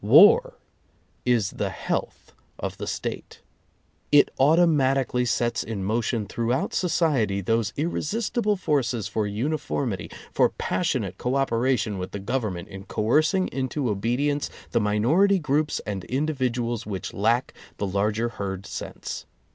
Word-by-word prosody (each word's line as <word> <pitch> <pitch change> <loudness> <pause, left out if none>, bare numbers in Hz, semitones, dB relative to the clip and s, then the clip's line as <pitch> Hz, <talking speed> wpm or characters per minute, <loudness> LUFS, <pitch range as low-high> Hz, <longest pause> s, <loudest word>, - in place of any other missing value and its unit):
War - - +7 0.7
is 120 -6 +2
the - - -2
health - - -4 0.2
of - - -4
the - - -5
State. - - -5 0.7
It 145 -1 +6
automatic 140 -3 +4
ally 125 0 +2
sets 120 +2 0
in 105 -4 -4
motion 110 +1 0
throughout 120 +5 -1
society 145 - +1
those 110 +1 0
irre 160 +4 -1
sistible 210 +3 0
forces 125 - 0
for 105 +1 -1
uniformity, 125 - -2 0.2
for - - +4
passionate - - -2
co 125 +2 -1
operation 120 -5 +1
with 90 +1 -5
the 100 - -3
Government 100 -5 -2
in 95 0 -9
coercing 155 - +2
into 130 -2 -1
obedience 125 +8 0 0.2
the - - +2
minority 130 - +3
groups 150 -2 0
and 100 -3 -4
individuals 125 -5 -1
which 95 -3 -4
lack 115 +5 +1 0.2
the 100 - -1
larger 105 +4 0
herd 95 -3 -5
sense. - - -6
120 Hz, 130 wpm, -25 LUFS, 105-145 Hz, 0.7 s, War